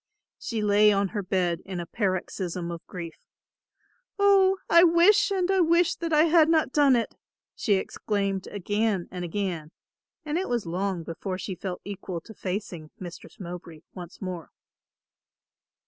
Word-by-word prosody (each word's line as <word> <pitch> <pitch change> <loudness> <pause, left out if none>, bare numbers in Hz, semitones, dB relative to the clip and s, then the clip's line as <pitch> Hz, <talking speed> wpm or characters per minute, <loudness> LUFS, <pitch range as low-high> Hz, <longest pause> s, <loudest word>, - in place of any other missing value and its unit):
She 225 -2 -3
lay 210 +1 +5
on 200 -1 +1
her 205 0 -3
bed 180 -3 0
in 185 -2 -5
a 170 - -4
paroxysm 185 -3 -2
of 170 0 -7
grief, 170 -3 -7 1.0
"Oh, 390 -1 +5
I 340 0 +7
wish 360 +5 +5
and 375 -1 +1
I 385 - +3
wish 340 0 +4
that 335 -1 -4
I 305 0 +5
had 325 -1 +5
not 315 -5 +2
done 285 -3 +5
it," 235 - -1 0.4
she 205 - +1
exclaimed 195 0 -2
again 205 -1 -1
and 180 -1 -5
again, 175 -3 -3 0.6
and 305 +3 -1
it 380 - -3
was 240 -4 -1
long 180 +1 -2
before 185 +4 -5
she 190 +1 -5
felt 180 0 -6
equal 195 -3 -5
to 220 - -13
facing 180 -5 -5
Mistress 175 -2 -10
Mowbray 175 -3 -8
once 180 -1 -10
more. 180 -3 -5
200 Hz, 155 wpm, -26 LUFS, 180-300 Hz, 1.0 s, I